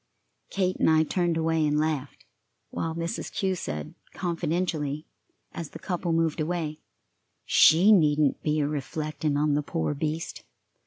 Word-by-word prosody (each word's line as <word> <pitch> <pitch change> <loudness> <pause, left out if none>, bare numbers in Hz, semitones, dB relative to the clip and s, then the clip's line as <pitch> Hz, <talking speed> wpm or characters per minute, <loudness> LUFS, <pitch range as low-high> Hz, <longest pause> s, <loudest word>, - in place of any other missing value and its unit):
Kate 185 -2 0
and - - +3
I 160 0 +5
turned 170 0 0
away 160 -1 +1
and 150 0 +2
laughed, 145 - -2 0.5
while 160 0 -3
Mrs. 170 +6 -4
Kew 190 -1 0
said, 75 - -5 0.2
confidentially, 165 -4 -2 0.5
as 165 -3 -6
the - - -9
couple 175 -2 -3
moved 165 0 +1
away: 155 -1 -2 0.7
"She 180 +7 +6
needn't 150 -6 +3
be 150 0 +1
a 145 - +1
reflectin' 150 +1 -2
on 150 0 +2
the 145 - +2
poor 160 0 -2
beast. 155 +2 -4
160 Hz, 145 wpm, -27 LUFS, 150-170 Hz, 0.7 s, She